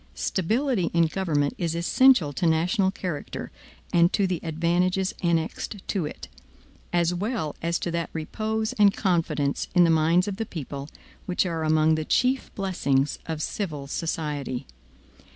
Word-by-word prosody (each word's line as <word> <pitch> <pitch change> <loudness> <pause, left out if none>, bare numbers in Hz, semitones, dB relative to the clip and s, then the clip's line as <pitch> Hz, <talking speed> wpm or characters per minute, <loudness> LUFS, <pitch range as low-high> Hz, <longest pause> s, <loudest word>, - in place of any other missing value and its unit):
Stability 215 - 0
in 170 0 +5
government 155 -4 0
is 170 -2 -1
essential 170 - +4
to 175 +4 0
national 180 +5 +2
character 180 -5 -5 0.4
and 170 +1 +5
to 200 - +2
the 180 -3 -1
advantages 175 +3 0
annexed 170 +3 -1
to 180 -7 0
it, - - -9 0.6
as 175 0 +2
well 195 - -2
as 170 0 0
to 170 - -3
that 170 0 -2
repose 220 +8 -2
and 205 0 +6
confidence 165 -7 0
in 180 - +7
the 165 - +4
minds 165 +4 +3
of 200 -2 -3
the 225 - -2
people, 140 -3 -6 0.4
which 180 +1 +1
are 165 -3 -2
among 155 0 +3
the 155 0 0
chief 255 - +1
blessings 150 -8 0
of 160 -2 -3
civil 155 -9 -3
society. 145 -4 -3
170 Hz, 150 wpm, -25 LUFS, 155-190 Hz, 0.6 s, in